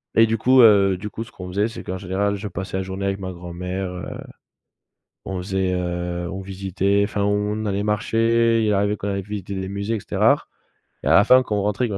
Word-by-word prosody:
Et 115 Hz, -, +7 dB
du 115 Hz, 0 st, 0 dB
coup, 130 Hz, +3 st, +5 dB
heu, 100 Hz, -4 st, +6 dB
du 105 Hz, +3 st, -6 dB
coup, 110 Hz, +3 st, -5 dB
ce 120 Hz, -, -15 dB
qu'on 90 Hz, -, -9 dB
faisait, 100 Hz, +4 st, +1 dB
c'est 115 Hz, -, -8 dB
qu'en 95 Hz, -, -4 dB
général, 100 Hz, +2 st, -1 dB
je 100 Hz, +1 st, -5 dB
passais 95 Hz, 0 st, -5 dB
la 95 Hz, -, -1 dB
journée 95 Hz, +1 st, -5 dB
avec 100 Hz, 0 st, -1 dB
ma 95 Hz, -1 st, -5 dB
grand-mère, 90 Hz, +2 st, -5 dB
heu, 90 Hz, -1 st, -6 dB, 1.2 s
on 95 Hz, -, -4 dB
faisait, 95 Hz, 0 st, -1 dB
heu, 90 Hz, -1 st, -3 dB
on 95 Hz, 0 st, -5 dB
visitait, 95 Hz, +1 st, 0 dB
enfin, 100 Hz, 0 st, -1 dB
on 105 Hz, +1 st, 0 dB
allait 100 Hz, 0 st, -1 dB
marcher, 115 Hz, +2 st, +2 dB
il 105 Hz, -, +2 dB
arrivait 100 Hz, +1 st, +1 dB
qu'on 100 Hz, -, -4 dB
aille 100 Hz, 0 st, -2 dB
visiter 100 Hz, 0 st, -6 dB
des 95 Hz, 0 st, -4 dB
musées 100 Hz, +3 st, -2 dB
et -, -, -3 dB
cetera, -, -, +2 dB, 0.6 s
et -, -, -9 dB
à -, -, +5 dB
la 100 Hz, -, +7 dB
fin 130 Hz, +3 st, +6 dB
quand 110 Hz, -4 st, -2 dB
on 100 Hz, -, 0 dB
rentrait, 105 Hz, +4 st, 0 dB
quand 105 Hz, -, -4 dB
100 Hz, 230 wpm, -22 LUFS, 95-105 Hz, 1.2 s, Et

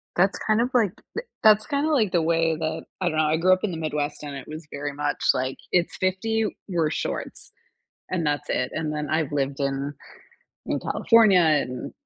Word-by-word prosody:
That's 190 Hz, +3 st, +3 dB
kind 215 Hz, 0 st, +1 dB
of 245 Hz, -, +1 dB
like 225 Hz, -7 st, +3 dB, 0.2 s
th 460 Hz, -, -4 dB, 0.2 s
that's 215 Hz, -1 st, +6 dB
kinda 285 Hz, +2 st, 0 dB
like 225 Hz, -11 st, +2 dB
the 175 Hz, -, +2 dB
way 165 Hz, 0 st, +2 dB
that 160 Hz, -1 st, -3 dB, 0.2 s
I 185 Hz, -, 0 dB
don't 155 Hz, -, -3 dB
know, 155 Hz, -, +4 dB
I 155 Hz, +1 st, +2 dB
grew 185 Hz, +3 st, +4 dB
up 185 Hz, -, -1 dB
in 210 Hz, -, 0 dB
the 165 Hz, -, -4 dB
Midwest, 150 Hz, -2 st, -3 dB
and 145 Hz, -1 st, -6 dB
it 135 Hz, -, -8 dB
was 155 Hz, 0 st, -8 dB
very 145 Hz, 0 st, -4 dB
much, 145 Hz, +1 st, -2 dB
like, 130 Hz, +1 st, -2 dB
it's 175 Hz, -1 st, +1 dB
50, 220 Hz, +4 st, 0 dB, 0.2 s
wear 170 Hz, -5 st, +1 dB
shorts. -, -, -4 dB, 0.6 s
And 175 Hz, -3 st, -1 dB
that's 145 Hz, -2 st, -1 dB
it, 125 Hz, 0 st, 0 dB
and 155 Hz, -1 st, -2 dB
then 150 Hz, -1 st, -3 dB
I've 155 Hz, -2 st, 0 dB
lived 140 Hz, -1 st, -1 dB
in 140 Hz, +1 st, -2 dB, 0.7 s
in -, -, -1 dB
California, 220 Hz, -5 st, +4 dB, 0.2 s
in 125 Hz, 0 st, -6 dB
160 Hz, 205 wpm, -25 LUFS, 145-190 Hz, 0.7 s, that's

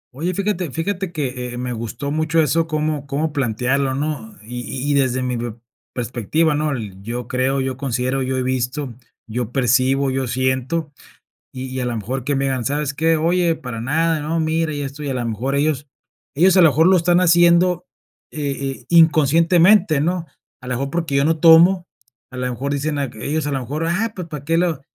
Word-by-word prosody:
Oye, 170 Hz, +5 st, -2 dB
fíjate 190 Hz, -4 st, -1 dB
fíjate 180 Hz, +5 st, -3 dB
que, 125 Hz, -5 st, -4 dB
eh, -, -, -6 dB
me 125 Hz, 0 st, -3 dB
gustó 115 Hz, +5 st, -5 dB
mucho 155 Hz, +1 st, +1 dB
eso 160 Hz, +2 st, +2 dB
cómo 155 Hz, -2 st, -2 dB
cómo 145 Hz, +3 st, -2 dB
plantearlo, 130 Hz, +1 st, 0 dB
¿no? 140 Hz, -6 st, -4 dB
Y 120 Hz, +2 st, -6 dB, 0.3 s
y -, -, +2 dB
desde 130 Hz, -2 st, +1 dB
mi 125 Hz, -1 st, -2 dB
pe 115 Hz, -2 st, -4 dB, 0.4 s
perspectiva, 125 Hz, +7 st, 0 dB
¿no? 150 Hz, 0 st, 0 dB, 0.3 s
Yo 120 Hz, +3 st, -5 dB
creo, 130 Hz, +2 st, 0 dB
yo 130 Hz, -1 st, -3 dB
considero, 130 Hz, 0 st, -1 dB
yo 130 Hz, 0 st, -1 dB
he 130 Hz, -, 0 dB
visto, 130 Hz, +1 st, -2 dB, 0.3 s
yo 120 Hz, +1 st, -4 dB
percibo, 130 Hz, +2 st, +2 dB
yo 130 Hz, -1 st, -1 dB
siento, 130 Hz, +5 st, -1 dB, 0.6 s
y 130 Hz, -1 st, -6 dB
y 130 Hz, 0 st, -5 dB
a 125 Hz, -, -1 dB
la 120 Hz, -1 st, -2 dB
mejor 125 Hz, +4 st, -4 dB
que 145 Hz, 0 st, 0 dB
me 135 Hz, 0 st, 0 dB
digan: 130 Hz, -3 st, -1 dB
"¿Sabes 145 Hz, +2 st, -1 dB
qué? 160 Hz, +2 st, +2 dB
Oye, 170 Hz, +1 st, +2 dB
para 115 Hz, -5 st, -6 dB
nada, 160 Hz, +5 st, +1 dB
no, 160 Hz, +3 st, -1 dB
mira". 160 Hz, 0 st, 0 dB
Y 145 Hz, -, -4 dB
esto, 140 Hz, +1 st, -6 dB
y 145 Hz, -, -3 dB
a -, -, -2 dB
la 120 Hz, -2 st, -2 dB
mejor 120 Hz, +5 st, -2 dB
ellos 145 Hz, 0 st, 0 dB, 0.5 s
ellos 180 Hz, +5 st, +4 dB
a 185 Hz, -, +7 dB
lo 160 Hz, -, +7 dB
mejor 160 Hz, +4 st, +3 dB
lo 190 Hz, 0 st, +6 dB
están 175 Hz, +1 st, +3 dB
haciendo, 175 Hz, 0 st, +4 dB, 0.5 s
eh, 145 Hz, -3 st, -3 dB
eh, 135 Hz, -, -10 dB
inconscientemente, 165 Hz, +2 st, +4 dB
¿no? 170 Hz, +2 st, -1 dB, 0.4 s
A -, -, -10 dB
la 125 Hz, 0 st, -2 dB
mejor 135 Hz, +3 st, -2 dB
porque 165 Hz, -2 st, -2 dB
yo 140 Hz, +1 st, +3 dB
no 160 Hz, 0 st, +1 dB
tomo, 170 Hz, +2 st, +6 dB, 0.4 s
a 130 Hz, -, -9 dB
la 125 Hz, 0 st, -1 dB
mejor 135 Hz, +4 st, -3 dB
dicen, 145 Hz, +1 st, -2 dB
ay 140 Hz, -3 st, -2 dB
que 110 Hz, -, -8 dB
ellos 150 Hz, 0 st, -1 dB
a -, -, -1 dB
lo 135 Hz, -2 st, -1 dB
mejor: 145 Hz, +6 st, -4 dB
"Ah, 210 Hz, +6 st, -1 dB
pues, 180 Hz, -3 st, -6 dB
¿para 150 Hz, -3 st, -7 dB
que 165 Hz, +3 st, +1 dB
lo 170 Hz, -4 st, 0 dB
140 Hz, 205 wpm, -20 LUFS, 130-165 Hz, 0.6 s, a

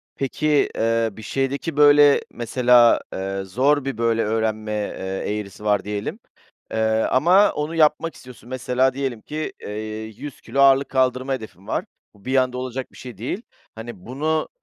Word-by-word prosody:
Peki, 145 Hz, +2 st, +1 dB
eee, 115 Hz, 0 st, +1 dB
bir 110 Hz, -, -11 dB
şeydeki, 135 Hz, +6 st, -2 dB
böyle, 145 Hz, -1 st, +6 dB
mesela, 120 Hz, 0 st, +4 dB
eee, 95 Hz, +1 st, -3 dB
zor 135 Hz, +8 st, +1 dB
bir, 135 Hz, -5 st, -3 dB
böyle, 115 Hz, -1 st, +1 dB
öğrenme, 110 Hz, 0 st, -1 dB
eee, 105 Hz, -1 st, -3 dB
eğrisi 100 Hz, 0 st, -9 dB
var 105 Hz, -1 st, +2 dB
diyelim, 105 Hz, 0 st, -4 dB, 0.5 s
eee, -, -, -3 dB, 0.3 s
ama 180 Hz, +10 st, +5 dB
onu 150 Hz, +2 st, -3 dB
yapmak 160 Hz, +1 st, +2 dB
istiyorsun. 125 Hz, -1 st, -14 dB
Mesela, 130 Hz, 0 st, +1 dB
diyelim 130 Hz, -5 st, -3 dB
ki, 155 Hz, +5 st, -5 dB
eee, -, -, -7 dB, 0.5 s
100 145 Hz, -3 st, -9 dB
kilo 140 Hz, -, -1 dB
ağırlık 135 Hz, 0 st, +5 dB
kaldırma 130 Hz, 0 st, +1 dB
hedefin 100 Hz, -6 st, -8 dB
var. -, -, -2 dB, 0.3 s
Bu 100 Hz, -, -22 dB
bir 130 Hz, +1 st, -1 dB
anda 125 Hz, -1 st, +1 dB
olacak 130 Hz, 0 st, -5 dB
bir -, -, -17 dB
şey 125 Hz, -5 st, -10 dB
değil. 125 Hz, -, -4 dB, 0.3 s
Hani, 110 Hz, -4 st, -9 dB
bunu, 155 Hz, +5 st, -1 dB
125 Hz, 160 wpm, -22 LUFS, 110-140 Hz, 0.5 s, böyle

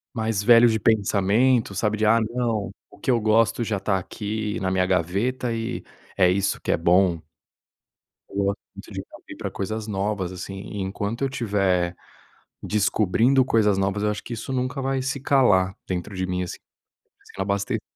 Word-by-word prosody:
Mas 110 Hz, -3 st, -1 dB
velhos 120 Hz, +1 st, +7 dB
de 110 Hz, -, 0 dB
pensamento, 110 Hz, +3 st, +2 dB
sabe, 105 Hz, +2 st, 0 dB
de: 110 Hz, -, +1 dB
"Ah, 115 Hz, +2 st, +5 dB
não, 115 Hz, -4 st, -1 dB, 0.2 s
o -, -, -17 dB
que -, -, -4 dB
eu 120 Hz, -2 st, +4 dB
gosto 115 Hz, +2 st, +2 dB
já 110 Hz, -2 st, -1 dB
está 95 Hz, 0 st, 0 dB
aqui 105 Hz, +3 st, -4 dB
na 95 Hz, -, -1 dB
minha 95 Hz, 0 st, +2 dB
gaveta 100 Hz, +8 st, 0 dB
e 115 Hz, +1 st, -3 dB, 0.3 s
é 90 Hz, -2 st, +4 dB
isso 95 Hz, +2 st, 0 dB
que -, -, -1 dB
é -, -, +2 dB
bom." 90 Hz, 0 st, +3 dB, 1.1 s
Eu -, -, -13 dB
gosto 100 Hz, +1 st, -1 dB, 0.2 s
muito -, -, -11 dB
de -, -, -5 dB
me -, -, -16 dB
abrir -, -, -7 dB
coisas 110 Hz, +2 st, -4 dB
novas, 100 Hz, -2 st, -2 dB
assim, 95 Hz, +1 st, -7 dB, 0.2 s
enquanto 100 Hz, +5 st, -3 dB
eu 135 Hz, -, +1 dB
tiver 100 Hz, -8 st, 0 dB, 0.7 s
descobrindo 110 Hz, +5 st, +2 dB
coisas 110 Hz, -5 st, +2 dB
novas, 100 Hz, +1 st, 0 dB
eu 105 Hz, -, +2 dB
acho 105 Hz, -, -5 dB
que 120 Hz, -, -6 dB
isso 120 Hz, +3 st, -5 dB
nunca 130 Hz, +1 st, -2 dB
vai 135 Hz, 0 st, -1 dB
se 135 Hz, +2 st, -2 dB
calar 105 Hz, -9 st, +3 dB
dentro 90 Hz, +2 st, -4 dB
de 95 Hz, 0 st, -1 dB
mim, 90 Hz, 0 st, -2 dB
assim, 90 Hz, -, -7 dB, 0.7 s
sem -, -, -6 dB
abaste 100 Hz, +1 st, -1 dB
105 Hz, 175 wpm, -24 LUFS, 95-115 Hz, 1.1 s, velhos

